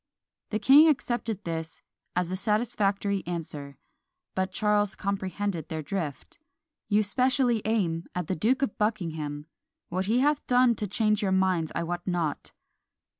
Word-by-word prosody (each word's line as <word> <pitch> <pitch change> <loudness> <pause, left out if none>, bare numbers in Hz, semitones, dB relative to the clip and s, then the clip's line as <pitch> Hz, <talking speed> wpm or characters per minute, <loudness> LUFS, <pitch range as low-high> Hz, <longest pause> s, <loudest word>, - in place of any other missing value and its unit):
The 215 - 0
king 285 +7 +7
accepted 240 - 0
this 165 -1 -5 0.3
"as 180 0 0
a - - -1
satisfactory 205 -2 0
answer;" 150 -5 -5 0.6
but 190 0 -1
Charles 205 0 +1
comprehended 195 -3 -3
their 160 -2 -4
drift 160 - -5 0.5
"You 210 0 +4
specially 250 +1 +2
aim 180 -7 0
at 180 -1 -2
the 185 - -2
Duke 250 - +1
of 260 - -2
Buckingham; 160 -9 -2 0.4
what 185 +2 -2
he 235 +4 +3
hath 295 +1 +1
done 250 -1 +5
to 210 - -2
change 215 +2 +1
your 195 -2 0
minds 185 -4 +1
I - - 0
wot 175 +1 -3
not." 170 -5 -2
195 Hz, 145 wpm, -27 LUFS, 170-220 Hz, 0.6 s, king